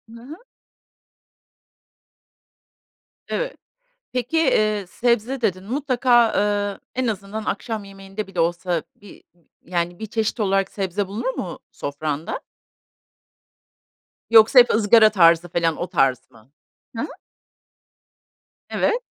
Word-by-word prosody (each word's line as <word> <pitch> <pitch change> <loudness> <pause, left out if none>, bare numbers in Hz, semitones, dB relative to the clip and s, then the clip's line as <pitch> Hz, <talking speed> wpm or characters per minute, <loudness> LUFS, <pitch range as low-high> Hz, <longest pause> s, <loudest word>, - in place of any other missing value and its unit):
Hı 230 - -12
hı. 280 +6 -10 2.9
Evet. - - -3 0.6
Peki, 255 +6 -1 0.2
ııı, 210 -2 0
sebze 240 +5 0
dedin, 185 -4 -1
mutlaka, 245 -2 +2
ııı, 205 -1 0
en 255 0 -1
azından 210 0 -4
akşam 220 -1 -3
yemeğinde 195 +1 -8
bile 180 -3 -4
olsa 175 0 0
bir 205 -2 -16 0.4
yani 175 0 -2
1 220 - -5
çeşit 220 +2 -2
olarak 195 -1 +1
sebze 195 0 -2
bulunur 240 +7 -3
mu 180 - -5
sofranda? 145 +2 -4 1.9
Yoksa 225 +3 +7
hep 240 - +6
ızgara 215 0 +6
tarzı 170 -3 +4
felan, 165 -2 0
o 175 - -3
tarz 130 -6 +1
mı? 115 +3 -21 0.5
Hı 230 - -1
hı. - - -3 1.6
Evet. 485 +2 0
205 Hz, 110 wpm, -22 LUFS, 175-230 Hz, 2.9 s, Yoksa